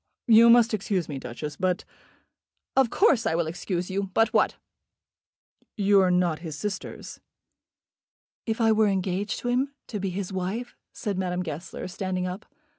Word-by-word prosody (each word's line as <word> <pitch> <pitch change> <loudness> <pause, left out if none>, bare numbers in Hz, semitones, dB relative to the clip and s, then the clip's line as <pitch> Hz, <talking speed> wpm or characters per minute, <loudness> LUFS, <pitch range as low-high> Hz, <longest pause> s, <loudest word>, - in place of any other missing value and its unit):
"You 230 0 +7
must 235 -1 +6
excuse 195 -3 -1
me, 140 -3 -5
Duchess, 145 +4 -6
but 185 -1 0 0.4
" - - -58
"Of 265 -3 +4
course 260 - +3
I 160 - +1
will 170 0 +1
excuse 175 +2 -3
you. 195 0 -2
But 225 -1 +3
what?" - - +3 1.2
"You 200 -1 +4
are 185 - +3
not 180 -3 +2
his 160 -4 -6
sisters." 195 +4 -6 1.3
"If 225 +1 -1
I 225 -1 +4
were 220 0 +4
engaged 195 +1 -1
to 245 - -2
him, 265 +3 0
to 210 - -3
be 195 0 -2
his 190 +1 -4
wife? 195 +7 -3
" - - -60
said 200 -4 -3
Madame 180 -1 -1
Goesler, 160 +3 -6
standing 185 0 -3
up. 185 +3 -6
190 Hz, 170 wpm, -26 LUFS, 180-220 Hz, 1.3 s, You